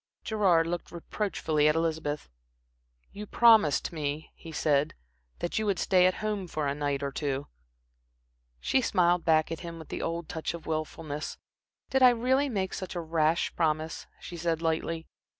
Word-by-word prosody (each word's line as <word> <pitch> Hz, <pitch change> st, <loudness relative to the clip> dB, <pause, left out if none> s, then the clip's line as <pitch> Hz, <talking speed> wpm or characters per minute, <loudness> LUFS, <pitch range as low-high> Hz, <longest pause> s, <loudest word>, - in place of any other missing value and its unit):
Gerard 190 Hz, -7 st, +3 dB
looked 175 Hz, +1 st, -4 dB
reproachfully 165 Hz, -4 st, 0 dB
at 150 Hz, -, +3 dB
Elizabeth. 160 Hz, -2 st, -1 dB, 0.8 s
"You 210 Hz, +1 st, -8 dB
promised 220 Hz, -11 st, +5 dB
me," 150 Hz, 0 st, -4 dB
he 165 Hz, -, -11 dB
said, 150 Hz, -1 st, +1 dB, 0.4 s
"that 175 Hz, -, -2 dB
you 215 Hz, -, -1 dB
would 195 Hz, -3 st, +1 dB
stay 185 Hz, 0 st, +4 dB
at 185 Hz, -, +1 dB
home 205 Hz, -3 st, -2 dB
for 155 Hz, -3 st, -3 dB
a 140 Hz, -, 0 dB
night 145 Hz, -1 st, -2 dB
or 140 Hz, -, -2 dB
two." 140 Hz, -1 st, -2 dB, 1.1 s
She 265 Hz, -, +2 dB
smiled 175 Hz, -6 st, +2 dB
back 155 Hz, -1 st, +3 dB
at 165 Hz, -, -3 dB
him 170 Hz, -1 st, -7 dB
with 160 Hz, -, -11 dB
the -, -, -4 dB
old 165 Hz, 0 st, -3 dB
touch 160 Hz, +1 st, -3 dB
of 170 Hz, -, -10 dB
wilfulness. 155 Hz, -1 st, -4 dB, 0.5 s
"Did 265 Hz, -, +2 dB
I 255 Hz, -, +9 dB
really 260 Hz, +4 st, +2 dB
make 190 Hz, -5 st, -2 dB
such 185 Hz, -1 st, -5 dB
a -, -, -1 dB
rash 160 Hz, 0 st, +1 dB
promise," 160 Hz, -1 st, -1 dB
she 175 Hz, -, -8 dB
said, 165 Hz, -1 st, 0 dB
lightly. 165 Hz, 0 st, -1 dB
165 Hz, 170 wpm, -29 LUFS, 155-185 Hz, 1.1 s, I